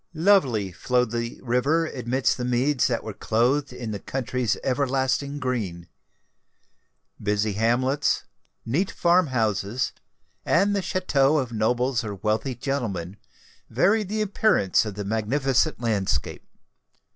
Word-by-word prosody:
Lovely 145 Hz, -, +3 dB
flowed 125 Hz, +5 st, 0 dB
the 115 Hz, 0 st, -3 dB
river 135 Hz, +7 st, +1 dB
amidst 130 Hz, -3 st, 0 dB
the 125 Hz, -, -3 dB
meads 125 Hz, +2 st, +1 dB
that 120 Hz, -3 st, -1 dB
were 110 Hz, -, -6 dB
clothed 125 Hz, +8 st, +1 dB
in 120 Hz, -3 st, -6 dB
the 100 Hz, -, -4 dB
country's 125 Hz, -1 st, -2 dB
everlasting 135 Hz, +1 st, 0 dB
green. 105 Hz, -11 st, -3 dB, 1.3 s
Busy 105 Hz, 0 st, 0 dB
hamlets, 125 Hz, +7 st, +1 dB, 0.4 s
neat 155 Hz, +12 st, 0 dB
farm 175 Hz, 0 st, +3 dB
houses, 110 Hz, -1 st, -1 dB, 0.5 s
and 205 Hz, +1 st, +2 dB
the 200 Hz, -, 0 dB
chateaux 155 Hz, -6 st, +2 dB
of 130 Hz, -5 st, -1 dB
nobles 120 Hz, +3 st, 0 dB
or 105 Hz, -2 st, -5 dB
wealthy 110 Hz, +6 st, -1 dB
gentlemen, 105 Hz, -9 st, -3 dB, 0.5 s
varied 205 Hz, 0 st, +2 dB
the 215 Hz, +1 st, -1 dB
appearance 200 Hz, -, +2 dB
of 105 Hz, -, -6 dB
the 105 Hz, -1 st, -5 dB
magnificent 130 Hz, +7 st, +1 dB
landscape. 110 Hz, -5 st, -1 dB
125 Hz, 120 wpm, -25 LUFS, 110-140 Hz, 1.3 s, Lovely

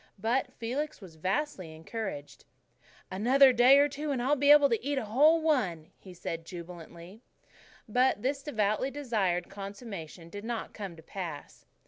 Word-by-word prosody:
But 245 Hz, +5 st, 0 dB
Felix 270 Hz, +7 st, -4 dB
was 185 Hz, -5 st, -12 dB
vastly 185 Hz, -, -3 dB
encouraged. 165 Hz, -3 st, -7 dB, 0.7 s
"Another 255 Hz, +7 st, +5 dB
prayer 260 Hz, +4 st, +6 dB
or -, -, +2 dB
two, 290 Hz, +2 st, -5 dB
and 275 Hz, -3 st, -1 dB
I'll 265 Hz, +4 st, +2 dB
be 285 Hz, +1 st, +2 dB
able 295 Hz, -1 st, +8 dB
to 230 Hz, -2 st, 0 dB
eat 285 Hz, +1 st, -1 dB
a 255 Hz, -, -1 dB
whole 295 Hz, +10 st, +4 dB
one," 215 Hz, -, 0 dB
he 190 Hz, -, -13 dB
said 165 Hz, -2 st, -6 dB
jubilantly. 170 Hz, +3 st, -10 dB, 0.7 s
But 245 Hz, -1 st, +2 dB
this 275 Hz, +2 st, -1 dB
devoutly 215 Hz, -2 st, 0 dB
desired 215 Hz, -11 st, -1 dB
consummation 195 Hz, -5 st, -8 dB
did 205 Hz, +2 st, -7 dB
not 230 Hz, 0 st, -4 dB
come 195 Hz, -5 st, -7 dB
to 160 Hz, -, -15 dB
pass. 170 Hz, -5 st, -8 dB
220 Hz, 155 wpm, -29 LUFS, 180-275 Hz, 0.7 s, able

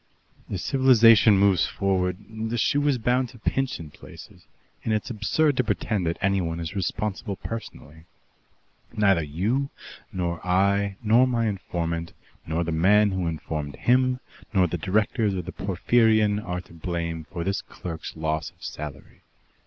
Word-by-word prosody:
As 95 Hz, -, -4 dB
civilization 115 Hz, -6 st, +6 dB
moves 95 Hz, -3 st, +4 dB
forward, 90 Hz, -2 st, 0 dB
the 110 Hz, +1 st, -4 dB
shoe 145 Hz, +5 st, +2 dB
is 140 Hz, -3 st, +3 dB
bound 125 Hz, +2 st, +1 dB
to 120 Hz, -, -14 dB
pinch 135 Hz, +3 st, -1 dB
in 80 Hz, -3 st, -9 dB
places, -, -, -14 dB, 0.4 s
and 110 Hz, -, +1 dB
it's 110 Hz, -, -3 dB
absurd 135 Hz, +7 st, +1 dB
to 130 Hz, -, +3 dB
pretend 105 Hz, -4 st, -1 dB
that 85 Hz, -, -1 dB
anyone 95 Hz, -4 st, 0 dB
is 85 Hz, +1 st, -5 dB
responsible 100 Hz, +1 st, -2 dB
personally. 80 Hz, -9 st, -8 dB, 0.9 s
Neither 100 Hz, -5 st, +4 dB
you, 100 Hz, -, -1 dB, 0.4 s
nor 85 Hz, -2 st, -3 dB
I, 100 Hz, +2 st, +1 dB
nor 115 Hz, +4 st, +5 dB
my 120 Hz, -2 st, 0 dB
informant, 85 Hz, -5 st, -3 dB, 0.3 s
nor 80 Hz, +2 st, 0 dB
the 85 Hz, -, -3 dB
man 100 Hz, +6 st, +4 dB
who 95 Hz, -2 st, -1 dB
informed 75 Hz, -2 st, -4 dB
him, 125 Hz, +1 st, +2 dB, 0.3 s
nor 95 Hz, -5 st, +3 dB
the 90 Hz, 0 st, -3 dB
directors 105 Hz, +3 st, +1 dB
of 90 Hz, -2 st, -4 dB
the 95 Hz, -, -5 dB
Porphyrion, 105 Hz, +2 st, +2 dB
are 90 Hz, -2 st, -3 dB
to 90 Hz, -, -18 dB
blame 85 Hz, -1 st, -4 dB
for 85 Hz, 0 st, -5 dB
this 100 Hz, +2 st, -1 dB
clerk's 80 Hz, -2 st, -8 dB
loss 80 Hz, -2 st, -2 dB
of -, -, -22 dB
salary. 75 Hz, -2 st, -8 dB
100 Hz, 155 wpm, -25 LUFS, 85-110 Hz, 0.9 s, civilization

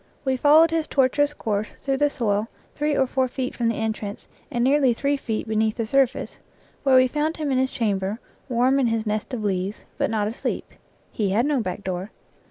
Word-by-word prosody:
We 265 Hz, -1 st, +2 dB
followed 305 Hz, +4 st, +6 dB
his 325 Hz, -1 st, 0 dB
tortuous 285 Hz, +2 st, +2 dB
course 215 Hz, -7 st, -3 dB
through 270 Hz, -1 st, -1 dB
the 290 Hz, +1 st, +3 dB
soil 215 Hz, -5 st, 0 dB, 0.3 s
three 295 Hz, 0 st, 0 dB
or 265 Hz, -, +4 dB
four 260 Hz, 0 st, 0 dB
feet 255 Hz, 0 st, -4 dB
from 235 Hz, -, -1 dB
the 230 Hz, -, +1 dB
entrance 215 Hz, -2 st, -4 dB, 0.2 s
and 240 Hz, -4 st, -1 dB
nearly 265 Hz, -2 st, +4 dB
three 280 Hz, +4 st, +1 dB
feet 225 Hz, -5 st, -3 dB
beneath 220 Hz, 0 st, 0 dB
the 230 Hz, -, -1 dB
surface, 265 Hz, +2 st, 0 dB, 0.4 s
where 270 Hz, -2 st, +4 dB
we 255 Hz, 0 st, +6 dB
found 300 Hz, +4 st, -1 dB
him 300 Hz, -3 st, -2 dB
in, 260 Hz, -, +2 dB
his 260 Hz, 0 st, +1 dB
chamber, 205 Hz, -1 st, -1 dB, 0.3 s
warm 255 Hz, +3 st, +3 dB
in 260 Hz, -, +3 dB
his 225 Hz, -1 st, -1 dB
nest 215 Hz, +3 st, -2 dB
of 240 Hz, -4 st, -3 dB
leaves, 195 Hz, 0 st, -2 dB
but -, -, +1 dB
not 210 Hz, -2 st, 0 dB
asleep. 225 Hz, -, -4 dB, 0.4 s
He 205 Hz, -3 st, -1 dB
had 220 Hz, +6 st, +2 dB
no 290 Hz, -4 st, +1 dB
back 185 Hz, -1 st, -4 dB
door. 185 Hz, +1 st, -3 dB
245 Hz, 205 wpm, -24 LUFS, 215-275 Hz, 0.4 s, followed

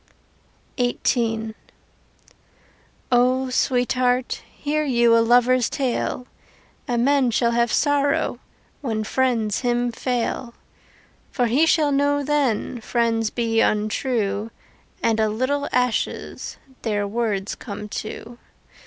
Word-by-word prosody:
XVIII 230 Hz, -2 st, 0 dB, 1.6 s
O 255 Hz, +1 st, +3 dB
Sweetheart, 250 Hz, 0 st, +1 dB
hear 305 Hz, +1 st, -2 dB
you 240 Hz, -4 st, +3 dB
Your 230 Hz, -, +5 dB
lover's 245 Hz, +1 st, +4 dB
tale; 250 Hz, -1 st, -2 dB, 0.6 s
A 245 Hz, -, 0 dB
man 265 Hz, +1 st, +3 dB
shall 235 Hz, 0 st, +2 dB
have 235 Hz, -1 st, +1 dB
sorrow 285 Hz, -1 st, +1 dB, 0.4 s
When 220 Hz, -6 st, -2 dB
friends 225 Hz, -3 st, 0 dB
him 245 Hz, -1 st, 0 dB
fail. 240 Hz, 0 st, -2 dB, 0.7 s
For 250 Hz, -, 0 dB
he 270 Hz, +8 st, +3 dB
shall 305 Hz, -3 st, +3 dB
know 285 Hz, +1 st, +2 dB
then 270 Hz, -5 st, 0 dB
Friends 225 Hz, -1 st, 0 dB
be 225 Hz, -1 st, 0 dB
untrue 215 Hz, -1 st, 0 dB, 0.5 s
And 225 Hz, -1 st, +2 dB
a 220 Hz, -1 st, +2 dB
little 270 Hz, +6 st, -1 dB
ashes 250 Hz, -2 st, -1 dB, 0.2 s
Their 205 Hz, -3 st, -1 dB
words 210 Hz, -3 st, -2 dB
come 210 Hz, -2 st, -7 dB
to. 230 Hz, +2 st, -8 dB
240 Hz, 105 wpm, -22 LUFS, 225-260 Hz, 1.6 s, Your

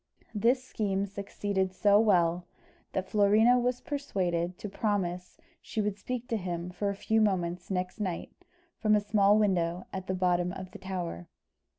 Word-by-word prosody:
This 235 Hz, +5 st, +2 dB
scheme 200 Hz, -6 st, -1 dB
succeeded 200 Hz, -1 st, -2 dB
so 205 Hz, +1 st, +5 dB
well, 175 Hz, -5 st, +3 dB, 0.5 s
that 190 Hz, 0 st, -2 dB
Florina 215 Hz, +5 st, +5 dB
was 245 Hz, 0 st, 0 dB
persuaded 180 Hz, -, -2 dB
to -, -, -6 dB
promise 190 Hz, -4 st, -2 dB, 0.2 s
she -, -, -5 dB
would 210 Hz, -1 st, 0 dB
speak 245 Hz, +2 st, -4 dB
to 230 Hz, -, +1 dB
him 175 Hz, -2 st, -4 dB
for 200 Hz, +3 st, -2 dB
a 200 Hz, -, -2 dB
few 220 Hz, +2 st, +1 dB
moments 180 Hz, -4 st, 0 dB
next 185 Hz, +1 st, -2 dB
night, 185 Hz, -5 st, -3 dB, 0.5 s
from 215 Hz, -1 st, +4 dB
a -, -, +4 dB
small 205 Hz, 0 st, +4 dB
window 180 Hz, -4 st, +1 dB
at 190 Hz, -1 st, -5 dB
the 185 Hz, -, -1 dB
bottom 180 Hz, -1 st, +1 dB
of 185 Hz, -1 st, -8 dB
the -, -, -10 dB
tower. 175 Hz, -, -5 dB
195 Hz, 165 wpm, -29 LUFS, 180-210 Hz, 0.5 s, so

